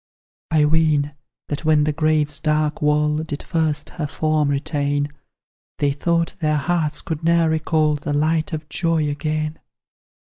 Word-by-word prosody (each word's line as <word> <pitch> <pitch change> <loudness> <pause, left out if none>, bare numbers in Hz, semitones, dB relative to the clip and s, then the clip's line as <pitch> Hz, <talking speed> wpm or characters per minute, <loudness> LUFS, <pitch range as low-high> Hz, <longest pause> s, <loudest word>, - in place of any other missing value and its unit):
I 155 -2 +4
ween, 150 -2 +2 0.4
that 145 +1 -3
when 155 -2 +4
the 150 0 0
grave's 155 -1 +1
dark 155 -1 0
wall 150 0 +2
Did 155 -2 -4
first 155 -3 -1
her 155 -4 -3
form 155 -1 0
retain, 145 0 0 0.7
They 145 -1 +1
thought 170 +4 0
their 155 -2 +1
hearts 155 0 -1
could 160 -1 -4
ne'er 165 -1 +3
recall 155 -1 +1
The 145 0 -4
light 155 +2 +1
of 155 -1 -5
joy 160 0 0
again. 155 +1 -2
155 Hz, 145 wpm, -21 LUFS, 150-160 Hz, 0.7 s, I